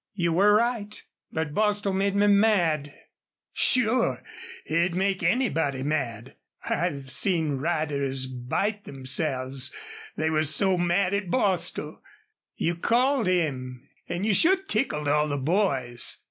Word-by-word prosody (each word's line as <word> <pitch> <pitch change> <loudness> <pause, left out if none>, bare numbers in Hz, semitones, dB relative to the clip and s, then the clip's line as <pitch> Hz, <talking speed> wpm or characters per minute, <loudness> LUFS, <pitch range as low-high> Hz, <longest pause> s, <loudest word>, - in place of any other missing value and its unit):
You 170 -4 0
were 205 +4 +4
right. 225 -2 -1 0.3
But 160 -2 -3
Bostil 205 -1 0
made 195 +1 0
me 205 +1 +3
mad." 190 -8 +2 0.6
"Sure! 230 - +2 0.4
He'd 170 +2 0
make 190 0 0
anybody 165 - 0
mad. 130 -5 -3 0.3
I've 140 -6 -2
seen 160 -4 +1
riders 140 -4 -1
bite 130 - -3
themselves, 130 -1 -1 0.5
they 160 +1 0
was 155 -1 +3
so 190 -2 +3
mad 180 +2 +1
at 200 -2 -2
Bostil. 180 -8 -1 0.5
You 170 +1 -1
called 245 +4 +1
him, 135 -7 -2 0.2
an' 175 +2 -3
you 215 -1 +2
sure 355 - +5
tickled 270 - -2
all 150 +1 +2
the 145 -1 -2
boys. 135 -6 0
170 Hz, 125 wpm, -26 LUFS, 140-200 Hz, 0.6 s, sure